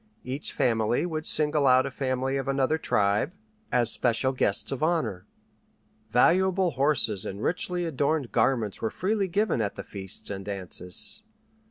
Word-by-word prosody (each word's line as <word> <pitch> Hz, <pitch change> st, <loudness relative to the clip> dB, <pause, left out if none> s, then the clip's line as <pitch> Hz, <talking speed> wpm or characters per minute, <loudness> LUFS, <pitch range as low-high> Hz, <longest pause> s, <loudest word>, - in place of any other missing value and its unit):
Each 130 Hz, +4 st, -5 dB
family 115 Hz, +3 st, +1 dB
would 160 Hz, -3 st, -3 dB
single 150 Hz, -2 st, +3 dB
out 130 Hz, 0 st, +5 dB
a 135 Hz, -, -4 dB
family 130 Hz, 0 st, -2 dB
of 135 Hz, 0 st, -3 dB
another 135 Hz, +3 st, +1 dB
tribe 105 Hz, -, +1 dB, 0.4 s
as 120 Hz, -3 st, +4 dB
special 120 Hz, +1 st, +3 dB
guests 115 Hz, -6 st, -1 dB
of 135 Hz, -, -4 dB
honor. 155 Hz, -, -1 dB, 0.8 s
Valuable 185 Hz, -, +3 dB
horses 135 Hz, -, +1 dB
and 100 Hz, -, -6 dB
richly 180 Hz, 0 st, -1 dB
adorned 145 Hz, -3 st, -1 dB
garments 115 Hz, -7 st, 0 dB
were 110 Hz, -, 0 dB
freely 195 Hz, -, -1 dB
given 200 Hz, -, 0 dB
at 100 Hz, -2 st, -2 dB
the -, -, -6 dB
feasts 95 Hz, 0 st, -7 dB
and 95 Hz, -1 st, -5 dB
dances. 95 Hz, -, -3 dB
130 Hz, 150 wpm, -27 LUFS, 110-160 Hz, 0.8 s, out